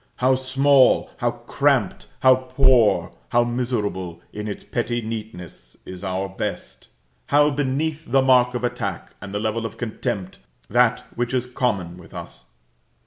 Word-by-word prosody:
How 130 Hz, +1 st, +3 dB
small, 130 Hz, +1 st, +3 dB
how -, -, +1 dB
cramped, -, -, 0 dB
how 130 Hz, 0 st, +7 dB
poor, 130 Hz, -3 st, +3 dB, 0.2 s
how 120 Hz, 0 st, +3 dB
miserable 105 Hz, -8 st, -2 dB
in 105 Hz, 0 st, -5 dB
its 100 Hz, -, -5 dB
petty 120 Hz, 0 st, -2 dB
neatness 110 Hz, -, -8 dB
is 95 Hz, 0 st, -9 dB
our 95 Hz, 0 st, -2 dB
best! 95 Hz, -, -6 dB, 0.4 s
how 145 Hz, +1 st, +4 dB
beneath 145 Hz, +1 st, -2 dB
the 135 Hz, 0 st, +4 dB
mark 125 Hz, -1 st, +4 dB
of 125 Hz, -, -3 dB
attack, 120 Hz, -, -3 dB
and 100 Hz, -, -8 dB
the 100 Hz, -, -2 dB
level 110 Hz, +2 st, -1 dB
of 115 Hz, 0 st, -6 dB
contempt, 100 Hz, -5 st, -4 dB, 0.3 s
that -, -, +3 dB
which 120 Hz, +2 st, -1 dB
is 125 Hz, -1 st, 0 dB
common 100 Hz, -9 st, -2 dB
with 80 Hz, -3 st, -14 dB
us! -, -, -9 dB
120 Hz, 145 wpm, -22 LUFS, 100-130 Hz, 0.4 s, how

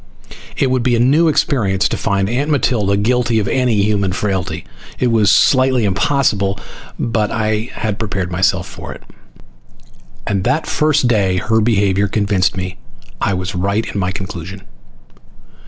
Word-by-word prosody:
It 135 Hz, -2 st, +1 dB
would 130 Hz, -1 st, +1 dB
be 120 Hz, 0 st, +2 dB
a -, -, 0 dB
new 145 Hz, +8 st, +4 dB
experience, 105 Hz, -10 st, +1 dB
to -, -, -2 dB
find 100 Hz, -2 st, 0 dB
Aunt 130 Hz, +7 st, -1 dB
Matilda 110 Hz, -8 st, +1 dB
guilty 120 Hz, +2 st, +1 dB
of 105 Hz, -2 st, 0 dB
any 120 Hz, -6 st, +1 dB
human 100 Hz, -3 st, 0 dB
frailty. 95 Hz, -2 st, -2 dB, 0.3 s
It 125 Hz, -2 st, +1 dB
was 110 Hz, -3 st, +3 dB
slightly 130 Hz, +1 st, +4 dB
impossible, 100 Hz, -2 st, +1 dB, 0.4 s
but 110 Hz, -3 st, -1 dB
I 110 Hz, +1 st, -1 dB
had 105 Hz, -2 st, -3 dB
prepared 95 Hz, -5 st, -3 dB
myself 90 Hz, +1 st, +1 dB
for -, -, -9 dB
it. -, -, -14 dB, 1.2 s
And 100 Hz, -2 st, -1 dB
that 135 Hz, +8 st, 0 dB
first 150 Hz, -4 st, +1 dB
day 100 Hz, -6 st, +1 dB
her 110 Hz, +5 st, +1 dB
behavior 100 Hz, -3 st, +2 dB
convinced 100 Hz, -1 st, 0 dB
me 90 Hz, 0 st, -4 dB, 0.4 s
I 100 Hz, -, +1 dB
was 90 Hz, +1 st, -4 dB
right 100 Hz, +4 st, -1 dB
in 100 Hz, -, -4 dB
my 90 Hz, -1 st, -1 dB
conclusion. 95 Hz, -1 st, -7 dB
105 Hz, 155 wpm, -17 LUFS, 95-120 Hz, 1.2 s, new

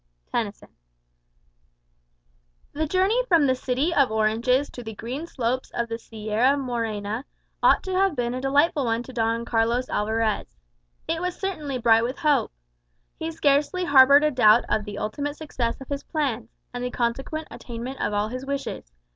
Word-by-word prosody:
Tennyson -, -, -3 dB, 2.0 s
The 315 Hz, +2 st, -1 dB
journey 385 Hz, +9 st, +2 dB
from 335 Hz, -7 st, +4 dB
the 260 Hz, -, +3 dB
city 260 Hz, +6 st, -1 dB
of 280 Hz, -5 st, +4 dB
oranges 230 Hz, +5 st, +2 dB
to 245 Hz, -, -8 dB
the 225 Hz, -2 st, -8 dB
green 260 Hz, +10 st, -5 dB
slopes 255 Hz, -2 st, -2 dB
of 235 Hz, 0 st, -1 dB
the 230 Hz, 0 st, -4 dB
Sierra 225 Hz, +5 st, 0 dB
Morena 230 Hz, -3 st, -3 dB, 0.4 s
ought -, -, +4 dB
to 380 Hz, -, -5 dB
have 380 Hz, -3 st, +2 dB
been 240 Hz, -1 st, -1 dB
a 255 Hz, -, -4 dB
delightful 280 Hz, +1 st, +2 dB
one 230 Hz, 0 st, 0 dB
to 260 Hz, -, -11 dB
Don 230 Hz, 0 st, 0 dB
Carlos 235 Hz, +2 st, +1 dB
Alvarez. 220 Hz, +1 st, -1 dB, 0.5 s
It 325 Hz, +1 st, -1 dB
was 360 Hz, 0 st, -3 dB
certainly 310 Hz, -9 st, -3 dB
bright 225 Hz, -1 st, +4 dB
with 250 Hz, +3 st, -3 dB
hope. 300 Hz, -2 st, +2 dB, 0.7 s
He 320 Hz, -, -3 dB
scarcely 305 Hz, +3 st, +1 dB
harboured 280 Hz, -1 st, +7 dB
a 305 Hz, -, +3 dB
doubt 235 Hz, -3 st, +5 dB
of 215 Hz, -, 0 dB
the 205 Hz, -, -7 dB
ultimate 285 Hz, +7 st, -3 dB
success 250 Hz, -7 st, -3 dB
of 270 Hz, -, -11 dB
his 280 Hz, -1 st, -3 dB
plans, 250 Hz, -8 st, -2 dB, 0.2 s
and 245 Hz, 0 st, -4 dB
the 250 Hz, -, -1 dB
consequent 270 Hz, +6 st, -2 dB
attainment 245 Hz, +2 st, -7 dB
of 205 Hz, -, 0 dB
all 205 Hz, +1 st, 0 dB
his 255 Hz, +2 st, -5 dB
wishes. 270 Hz, -, -5 dB
255 Hz, 165 wpm, -25 LUFS, 230-290 Hz, 2.0 s, harboured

